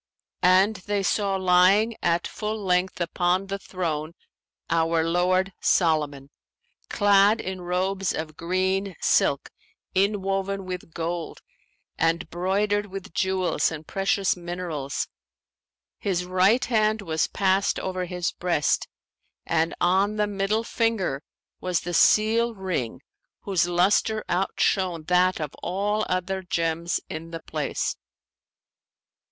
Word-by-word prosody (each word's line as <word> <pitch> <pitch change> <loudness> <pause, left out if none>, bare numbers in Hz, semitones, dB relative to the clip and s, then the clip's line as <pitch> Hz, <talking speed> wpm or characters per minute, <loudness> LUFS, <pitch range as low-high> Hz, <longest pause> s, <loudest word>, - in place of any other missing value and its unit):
And 190 +4 +4
they 200 +1 -2
saw 200 0 +1
lying 190 +4 +4
at 170 0 +1
full 215 0 -4
length 180 -2 0
upon 175 +2 0
the 195 0 -4
throne 165 -5 -3 0.5
our 165 0 +2
lord 180 +3 +1
Solomon, 150 -5 +1 0.6
clad 205 +1 +4
in 190 0 -5
robes 185 +2 -1
of 155 -1 -5
green 185 +3 -1
silk - - +2 0.4
inwoven 195 0 0
with 180 -2 -6
gold 170 0 -4 0.6
and 165 +1 +1
broidered 205 +4 0
with 195 -3 -8
jewels 190 -2 +1
and 160 -1 -7
precious 195 +1 +1
minerals: 175 -6 -4 0.9
his 180 -3 -1
right 185 +7 +3
hand 215 -2 +1
was 160 -4 0
passed 195 0 +1
over 185 -1 -3
his 180 -1 -2
breast 170 -5 0 0.6
and 165 0 0
on 190 +4 +2
the 210 0 +1
middle 205 +2 -1
finger 225 -12 -1 0.4
was 180 -2 -1
the 175 - -5
seal 225 +5 +4
ring 175 - -3 0.4
whose 185 -4 +1
lustre 195 +5 +2
outshone 180 -1 0
that 180 +2 +2
of 150 -3 -4
all 205 +4 -1
other 185 +1 -1
gems 170 -2 -1
in 160 +1 -7
the 165 -1 -7
place. 150 -3 -2
185 Hz, 115 wpm, -25 LUFS, 170-195 Hz, 0.9 s, And